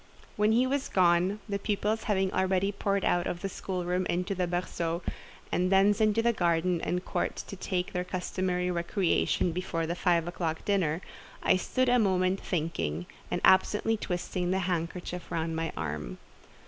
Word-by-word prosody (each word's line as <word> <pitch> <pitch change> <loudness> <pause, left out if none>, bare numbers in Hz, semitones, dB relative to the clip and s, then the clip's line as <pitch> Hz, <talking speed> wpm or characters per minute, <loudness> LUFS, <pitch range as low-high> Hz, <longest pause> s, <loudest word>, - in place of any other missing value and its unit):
When 210 +1 +3
he 240 +3 +4
was 275 +1 -1
gone, 180 +3 +3
the 200 -1 -2
pupils 210 +2 -1
having 190 -3 +1
already 190 +1 +1
poured 200 -1 -1
out 175 0 +2
of 175 - -3
the - - 0
schoolroom 180 -1 -2
into 180 +3 -1
the 180 -2 -1
berceau, 170 -1 -2 0.5
and 180 +1 +1
thence 200 +2 +4
into 215 +1 +3
the 235 0 +3
garden 175 -2 +1
and 180 +1 -2
court - - -1
to - - -7
take 185 -1 -2
their 180 -1 -1
customary 180 0 -1
recreation 175 0 +1
before 165 -1 -2
the 165 - -1
five 175 -2 +1
o'clock 165 -2 -3
dinner, 180 -5 +1 0.4
I - - +5
stood 255 +7 0
a 245 0 +4
moment 190 -2 +2
thinking, 150 - -2 0.2
and 175 - -1
absently 210 +4 +4
twisting 180 -3 -2
the 190 +1 +1
handkerchief 175 0 -3
round 165 0 -1
my 165 0 -2
arm. - - -4
180 Hz, 165 wpm, -29 LUFS, 175-200 Hz, 0.5 s, I